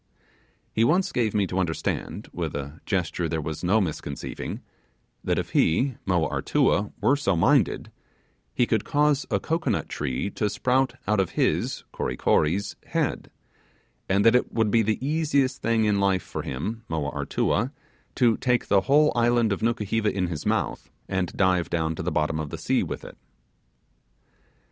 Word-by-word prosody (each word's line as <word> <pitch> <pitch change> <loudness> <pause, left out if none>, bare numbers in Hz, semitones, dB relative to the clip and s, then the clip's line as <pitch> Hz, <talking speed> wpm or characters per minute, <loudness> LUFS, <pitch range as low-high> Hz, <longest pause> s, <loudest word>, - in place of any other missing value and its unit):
He 110 - +2
once 180 +10 +2
gave 110 -4 0
me 100 -2 +3
to 95 0 -2
understand, 85 -3 -2
with - - -3
a 70 +2 -6
gesture 90 -3 -1
there 80 0 -1
was 80 +2 -5
no 100 +5 +3
misconceiving, 85 -7 -4 0.6
that - - 0
if - - -3
he 130 - +2
(Moa 90 -4 +2
Artua) 100 +8 +1
were 140 - +3
so 120 -10 0
minded 85 - +2 0.6
he 125 - +2
could 110 -3 0
cause 145 -1 +1
a - - +1
cocoanut 160 - -1
tree 75 +7 -2
to 105 - -1
sprout 130 +5 +1
out 105 0 +2
of 95 - -1
his - - 0
(Kory 60 - -3
Kory's) 95 +7 +1
head; - - -1 0.8
and 100 +1 +2
that 115 - +7
it 125 - +2
would 110 -3 +1
be 115 - +4
the 110 -1 +1
easiest 145 -4 +1
thing 115 -1 +2
in 105 -1 +2
life 95 -2 +2
for - - -5
him 105 - -4
(Moa 80 -3 -2
Artua) 115 +6 0 0.4
to 120 -4 +3
take 125 -2 0
the 100 -1 +5
whole 150 +7 +4
island 120 -2 +3
of 100 - -5
Nukuheva 115 -1 0
in 90 -2 -1
his 80 -4 -4
mouth - - -1 0.2
and 95 -2 -1
dive 90 -3 +2
down 80 -1 0
to - - -5
the 90 +2 -2
bottom 80 0 0
of 75 -2 -4
the - - -6
sea - - +1
with - - -5
it. - - -12
100 Hz, 170 wpm, -25 LUFS, 85-120 Hz, 0.8 s, that